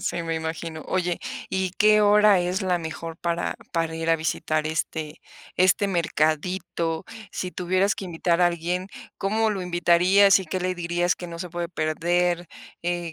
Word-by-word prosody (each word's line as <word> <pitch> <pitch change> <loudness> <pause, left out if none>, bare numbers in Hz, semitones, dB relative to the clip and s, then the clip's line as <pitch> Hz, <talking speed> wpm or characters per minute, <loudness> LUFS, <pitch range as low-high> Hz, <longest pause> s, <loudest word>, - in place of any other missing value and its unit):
Sí, 170 - -2
me 165 0 -2
imagino. 160 0 -4
Oye, 180 -2 0 0.3
¿y 190 -1 -1
qué 215 0 +6
hora 210 -1 +5
es 180 +2 -1
la 180 -1 +1
mejor 165 0 -6
para 170 0 -2 0.2
para 165 -1 -1
ir 165 0 -1
a 165 - +4
visitar 155 -1 -1
este 155 0 -3 0.4
este 185 +2 +4
mercadito? 165 -1 -1 0.3
Si 180 -1 -4
tuvieras 185 +2 +1
que - - -7
invitar 170 0 0
a 175 - +6
alguien, 175 +2 -2 0.3
¿cómo 220 +3 +1
lo 195 -3 -3
invitarías 180 +3 +4
y 185 - -7
qué 185 - -2
le 185 0 -1
dirías 175 +1 0
que 175 - -8
no 170 0 -8
se 180 +1 -5
puede 170 0 -4
perder? 175 +2 0 0.3
Eh, 175 -1 -2
175 Hz, 170 wpm, -24 LUFS, 165-185 Hz, 0.4 s, qué